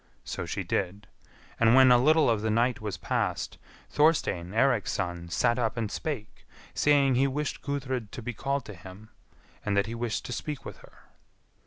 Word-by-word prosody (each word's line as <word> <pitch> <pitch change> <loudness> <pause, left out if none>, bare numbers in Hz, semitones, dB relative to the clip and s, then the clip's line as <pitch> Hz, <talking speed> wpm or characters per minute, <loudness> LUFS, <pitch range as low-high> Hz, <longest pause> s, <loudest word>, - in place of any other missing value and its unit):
So - - -5
she - - -3
did, 100 +1 -2 0.5
and 115 +1 +5
when 130 -1 +7
a 125 - +8
little 155 +3 +4
of 115 -3 +2
the 110 - -1
night 120 +3 +1
was 105 -3 -4
past, - - -2 0.3
Thorstein, 150 - +2
Eirik's 120 -1 +2
son, 85 -3 -3
sat 120 +7 +1
up 115 -1 -1
and 110 -3 -2
spake, 130 -9 -5 0.3
saying 140 -2 +3
he 135 +2 +3
wished 145 +2 -3
Gudrid 130 -5 -3
to 120 - -7
be 125 +1 -4
called 140 +3 -2
to 105 - -8
him, 95 +4 -12 0.5
and 100 -1 0
that 100 - +3
he 115 - -6
wished 115 -1 -3
to 125 - -4
speak 145 +2 -5
with - - -8
her. - - -19
120 Hz, 185 wpm, -28 LUFS, 105-135 Hz, 0.5 s, a